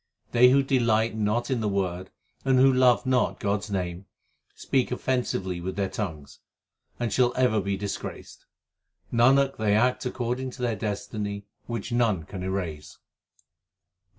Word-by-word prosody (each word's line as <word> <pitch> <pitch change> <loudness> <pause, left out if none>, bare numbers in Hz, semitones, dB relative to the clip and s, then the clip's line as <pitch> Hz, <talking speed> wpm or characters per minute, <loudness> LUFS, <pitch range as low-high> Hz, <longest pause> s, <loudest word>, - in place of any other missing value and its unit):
They 125 +1 +6
who 135 +2 +4
delight 115 -4 +2
not 110 +4 0
in 130 - +1
the 110 -2 0
Word 95 -2 -2 0.3
and 130 -1 +3
who 135 +1 +6
love 125 -1 +4
not 130 -1 +1
God 100 0 0
s 105 - -9
name, 90 -1 -3 0.5
Speak 130 -2 0
offensively 115 -9 -1
with 95 +2 -4
their 100 -1 -1
tongues, 80 -9 -6 0.6
and 120 -4 -1
shall 125 -1 +3
ever 125 -4 +2
be 100 0 -2
disgraced. 100 0 -7 0.7
Nanak, 135 +3 +4
they 105 -2 +2
act 125 +4 +2
according 125 +1 -3
to 125 - -7
their 120 -2 0
destiny 105 -1 -4 0.2
which 120 +1 -4
none 115 -8 +1
can 95 +4 -8
erase. 90 -6 -4
110 Hz, 150 wpm, -26 LUFS, 100-125 Hz, 0.7 s, They